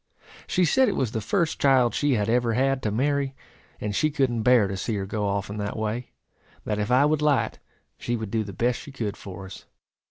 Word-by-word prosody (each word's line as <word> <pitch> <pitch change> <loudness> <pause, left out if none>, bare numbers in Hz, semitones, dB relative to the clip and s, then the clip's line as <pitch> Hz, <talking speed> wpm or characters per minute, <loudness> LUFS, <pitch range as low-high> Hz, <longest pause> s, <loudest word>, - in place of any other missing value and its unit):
She 180 -1 +2
said 260 +9 +4
it - - -2
was 125 -5 0
the 110 - -2
first 160 - 0
child 130 -4 +4
she 145 -1 +1
had 105 -2 0
ever 120 0 +2
had 135 +2 +1
to 110 - -1
marry; 140 +3 0 0.4
and 105 -1 -3
she 155 - +2
couldn't 135 -6 0
bear 120 -3 +5
to 95 - -4
see 105 +4 -2
her 100 -1 -2
go 105 +1 -2
off 100 0 -1
in 105 - -6
that 105 +1 -3
way; 110 +3 -3 0.6
that 105 -1 -1
if 105 - -1
I 130 +3 +5
would 150 0 +1
light, 140 -7 +1 0.4
she 120 - -2
would 110 -3 -5
do 110 -1 0
the 100 - -7
best 120 +5 0
she 145 - -10
could 110 -7 -3
for 95 0 -9
us. 95 - -11
120 Hz, 230 wpm, -25 LUFS, 105-135 Hz, 0.6 s, bear